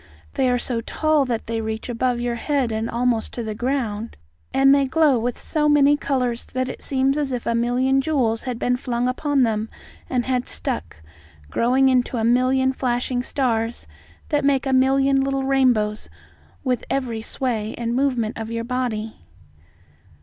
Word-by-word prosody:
They 255 - +1
are 245 - +2
so 240 -1 -2
tall 310 +4 +1
that 235 -3 -2
they 225 0 -2
reach 220 0 -4
above 245 0 0
your 240 0 -1
head 260 0 -1
and 220 +1 -2
almost 235 -1 0
to 240 - -4
the 220 -1 -4
ground, 230 -2 -2 0.3
and 270 0 +5
they 280 -1 +3
glow 280 -2 +3
with 240 +1 -2
so 300 -1 0
many 290 0 +5
colours 250 -5 -1
that 255 0 -3
it - - -7
seems 270 +1 +1
as 285 -2 -1
if 245 -2 -3
a 235 - +1
million 250 +3 +2
jewels 255 -7 0
had 250 -3 -4
been 245 +1 0
flung 245 -1 -1
upon 275 +1 +1
them 220 -1 0 0.4
and 250 -2 0
had 250 -1 -1
stuck, - - -3 0.6
growing 260 +3 +3
into 255 -1 +2
a 225 - -1
million 255 +3 +3
flashing 245 -1 -1
stars 235 -3 -1 0.4
that 295 -2 +1
make 275 -1 +2
a 270 - 0
million 270 +1 +3
little 270 0 -1
rainbows 245 -6 +1 0.5
with 250 -3 0
every 245 -5 -2
sway 225 -2 -3
and 235 0 -2
movement 250 -5 0
of 225 0 -5
your 230 0 -3
body." 230 -3 -3
250 Hz, 170 wpm, -22 LUFS, 230-270 Hz, 0.6 s, and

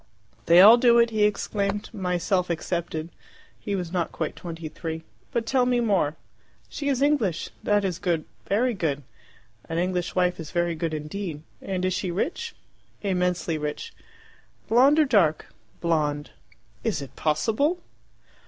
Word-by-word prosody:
"They 170 +2 +8
all 220 +5 +10
do 235 -1 +5
it," 235 0 +4
he 215 -1 +3
exclaimed, 205 0 -1
"myself 180 -1 0
excepted." 170 -1 -3 0.5
He 205 - -3
was 180 -3 -4
not 175 -3 -1
quite 155 - -3
twenty 165 -2 -7
three. 160 +1 -6 0.3
"But 235 -1 -1
tell 250 +1 +2
me 245 -1 +2
more. 195 -10 +1 0.5
She 285 -1 -3
is 270 -1 +1
English. 235 - +1
That 205 -1 +2
is 180 -3 -2
good, 170 -4 0 0.2
very 240 +5 +2
good. 150 -8 -2 0.7
An 165 - -2
English 180 0 -1
wife 180 -1 +1
is 160 -2 -6
very 175 -1 0
good 160 0 -2
indeed. 155 +1 -5 0.2
And 185 -2 -3
she 185 +1 -2
is 175 - -3
rich?" 365 - -2 0.5
"Immensely 180 -4 0
rich." 150 - -4 0.7
"Blonde 265 +6 +5
or 310 - +5
dark?" 195 - +2 0.3
"Blonde." 150 -3 0 0.5
"Is 210 -11 -1
it 135 - -12
possible!" 225 - +1
180 Hz, 150 wpm, -25 LUFS, 165-220 Hz, 0.7 s, all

